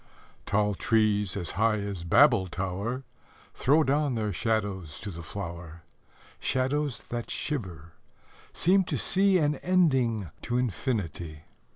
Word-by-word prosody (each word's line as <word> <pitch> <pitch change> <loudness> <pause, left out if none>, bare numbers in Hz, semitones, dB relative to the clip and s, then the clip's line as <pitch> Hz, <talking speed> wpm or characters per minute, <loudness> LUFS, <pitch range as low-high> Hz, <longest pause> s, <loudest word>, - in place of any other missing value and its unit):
Tall 105 0 +2
trees, 105 -2 +1
as 90 -4 -2
high 110 +2 +2
as 100 -4 -4
Babel 115 - +5
tower, 95 +8 -3 0.5
Throw 150 +4 +3
down 145 -1 +1
their 105 -3 -1
shadows 100 -7 -2
to 100 - -5
the 85 -1 -8
flower 85 -1 -7 0.6
Shadows 135 +1 0
that 120 -1 -4
shiver 90 - -4 0.6
seem 190 +3 +3
to - - -2
see 195 0 +3
An 150 -3 +1
ending 130 - +1
to 120 - -1
infinity. 90 - -3
110 Hz, 120 wpm, -28 LUFS, 90-135 Hz, 0.6 s, Babel